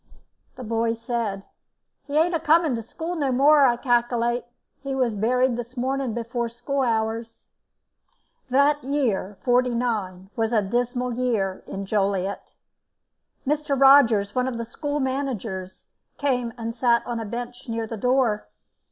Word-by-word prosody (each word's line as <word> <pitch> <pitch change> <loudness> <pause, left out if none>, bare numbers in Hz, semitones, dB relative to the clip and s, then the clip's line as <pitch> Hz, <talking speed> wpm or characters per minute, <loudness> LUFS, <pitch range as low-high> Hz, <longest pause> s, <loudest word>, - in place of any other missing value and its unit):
The 255 - -8
boy 230 0 0
said: 230 -4 -3 0.6
"He 290 +1 -1
ain't 340 +3 +3
a 330 - +1
coming 320 -2 +3
to 230 - -2
school 325 +10 -5
no 285 -5 0
more, 280 +2 +6
I 240 -1 +2
calkilate. 240 -1 +1 0.4
He 275 -1 -3
was 250 -4 +1
buried 245 +4 +1
this 240 +2 -7
morning 260 -1 -1
before 235 0 -2
school 245 +4 -3
hours." 225 -1 -2 1.0
That 280 +3 +3
year, 240 -8 -1
'49 235 -7 0
was 225 +1 0
a 215 -3 +3
dismal 245 +4 -1
year 225 -6 -1
in 195 0 -5
Joliet. 195 -1 -1 0.9
Mr. 290 -1 0
Rogers, 235 -7 +6
one 250 0 +1
of 250 -3 -3
the 230 - -4
school 290 +4 -3
managers, 240 -9 -3 0.3
came 250 -4 0
and 230 0 -4
sat 235 -1 +2
on 240 -1 -3
a - - -3
bench 245 +3 -6
near 225 0 -2
the 225 - -6
door. 245 -2 +1
240 Hz, 145 wpm, -24 LUFS, 225-265 Hz, 1.0 s, more